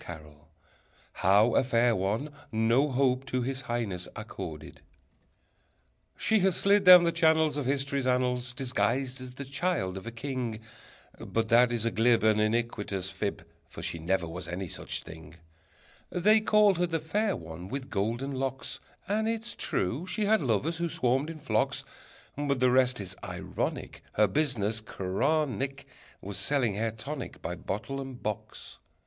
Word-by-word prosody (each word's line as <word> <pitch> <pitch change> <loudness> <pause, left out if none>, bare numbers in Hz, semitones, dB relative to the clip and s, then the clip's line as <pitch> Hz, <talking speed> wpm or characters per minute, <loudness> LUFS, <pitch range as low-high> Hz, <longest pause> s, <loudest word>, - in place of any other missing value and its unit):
_] 75 -3 -9 0.8
How 105 +5 +4
a - - +4
Fair 120 -2 +3
One 105 +10 -1 0.2
no 115 +6 +3
Hope 130 -1 +2
to 130 -1 -1
His 130 +1 -3
Highness 115 -8 -3
Accorded 95 -8 -8 1.4
She 220 - +2
has 190 -2 +3
slid 200 0 +4
down 180 -1 +10
the 170 - +2
channels 160 -3 +3
Of 145 -3 -2
history's 140 -1 0
annals 125 -1 0
Disguised 130 0 0
as 125 -1 -7
the 140 - -6
child 140 - -1
of 95 - -8
a - - -4
king, 120 -2 -4 0.6
But 115 -1 -2
that 120 +1 +5
is 115 -2 -1
a 115 - +1
glib 115 0 +3
And 110 -1 +4
iniquitous 105 -4 -1
fib, 100 -5 -4 0.2
For - - -9
she 85 - -2
never 85 +1 0
was 85 +1 -6
any 90 +2 -4
such - - -4
thing: 80 -1 -11 0.7
They 210 +5 +4
called 210 -4 +4
her 175 - +2
the 165 -1 -1
Fair 205 +6 0
One 80 +2 -8
with 135 +4 -6
Golden 115 +7 -1
Locks, 135 0 -3 0.3
And 215 +2 0
it's 230 +1 -1
true 125 - -2
she 210 +2 -1
had 220 +1 +3
lovers 140 +6 0
who 170 0 -1
swarmed 135 +2 +1
in 165 - -6
flocks, 150 - 0 0.5
But 140 -2 -1
the 125 0 +4
rest 125 -1 +3
is 95 -2 -5
ironic; - - -4
Her 105 - +4
business 110 -2 0
chronic 135 +7 -1 0.4
Was 100 -1 -6
selling 125 0 +1
hair 110 +3 -1
tonic 130 +5 -6
By 85 - -3
bottle 110 +9 -4
and 130 -2 -8
box! 105 -1 -6
125 Hz, 160 wpm, -29 LUFS, 105-145 Hz, 1.4 s, down